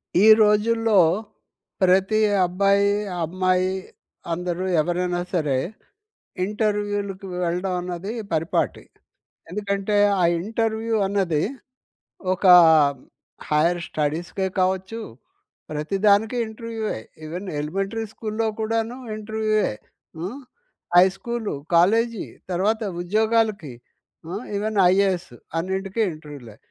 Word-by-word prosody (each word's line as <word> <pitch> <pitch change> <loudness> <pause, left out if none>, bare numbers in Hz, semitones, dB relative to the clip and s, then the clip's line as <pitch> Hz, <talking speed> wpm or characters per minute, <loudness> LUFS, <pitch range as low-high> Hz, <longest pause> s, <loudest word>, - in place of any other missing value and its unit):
ఈ 195 +4 +5 0.2
రోజుల్లో 215 0 +3 0.8
ప్రతి 190 +3 +3 0.3
అబ్బాయి, 200 +3 +2 0.3
అమ్మాయి 185 +2 +1 0.6
అందరూ 180 +1 -3 0.2
ఎవరైనా 175 +2 -1
సరే 150 -7 +1 0.9
ఇంటర్వ్యూ‌లకి 205 -1 -2 0.2
వెళ్ళడం 180 +2 -1
అన్నది 180 +3 -5 0.2
పరిపాటి. 165 +1 0 0.7
ఎందుకంటే, 200 +1 -1 0.3
ఆ - - +4 0.2
ఇంటర్వ్యూ 225 +2 -1
అన్నది 190 -6 0 0.9
ఒక 185 - -5 1.0
హైర్ 165 +4 +2
స్టడీస్‌కే 165 +5 -2
కావచ్చు, 190 +4 0 0.7
ప్రతి 155 +6 -2
దానికి 215 +4 +3
ఇంటర్వ్యూవే. 220 - -5 0.3
ఈవెన్ 175 +5 -6
ఎలిమెంటరీ 195 +9 -3
స్కూల్‌లో 220 0 -2
కూడాను 225 +2 -1 0.2
ఇంటర్వ్యూవే. 215 0 0 0.5
హ్మ్, 195 +11 -5 0.6
హై 180 +1 +9
స్కూలు, 235 +1 -4 0.2
కాలేజీ 225 +6 +3 0.3
తర్వాత 210 +6 +1 0.2
ఉద్యోగాలకి 215 - +1 0.5
హ్మ్, 195 +7 -5
ఈవెన్ 215 +1 -2
ఐఏఎస్ 190 -3 +1 0.3
అన్నింటికీ 190 +4 -2
ఇంటర్వ్యూలే. 145 -8 -11
195 Hz, 90 wpm, -23 LUFS, 175-215 Hz, 1.0 s, హై